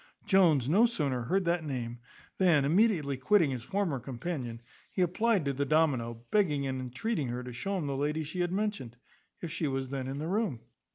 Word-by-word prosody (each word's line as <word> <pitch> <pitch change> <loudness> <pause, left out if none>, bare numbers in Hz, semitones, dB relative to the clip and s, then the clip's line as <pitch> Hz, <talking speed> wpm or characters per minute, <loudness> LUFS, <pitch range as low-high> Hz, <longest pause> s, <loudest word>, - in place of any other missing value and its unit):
Jones 165 - +4
no 205 +11 +5
sooner 140 - -1
heard 190 +8 +1
that 170 -1 +1
name, 120 -5 -4 0.4
than, 170 -7 +4
immediately 160 - +2
quitting 160 +3 +3
his 125 -2 -3
former 175 - -1
companion, 125 -1 -5 0.3
he 185 - +1
applied 200 0 +1
to 140 - 0
the 140 +2 -1
domino, 130 -7 +1
begging 155 -10 +2
and 130 -1 -2
entreating 135 - -2
her 120 +1 -4
to 125 0 -7
show 195 +11 -2
him 170 - -2
the 140 -1 -2
lady 150 +3 -1
she 155 +5 -6
had 175 0 0
mentioned, 195 - -2 0.4
if 170 - -5
she 160 -1 -1
was 135 -1 -2
then 135 -1 -3
in 135 +1 -4
the 155 +2 -3
room. 190 - -1
150 Hz, 195 wpm, -30 LUFS, 130-185 Hz, 0.4 s, no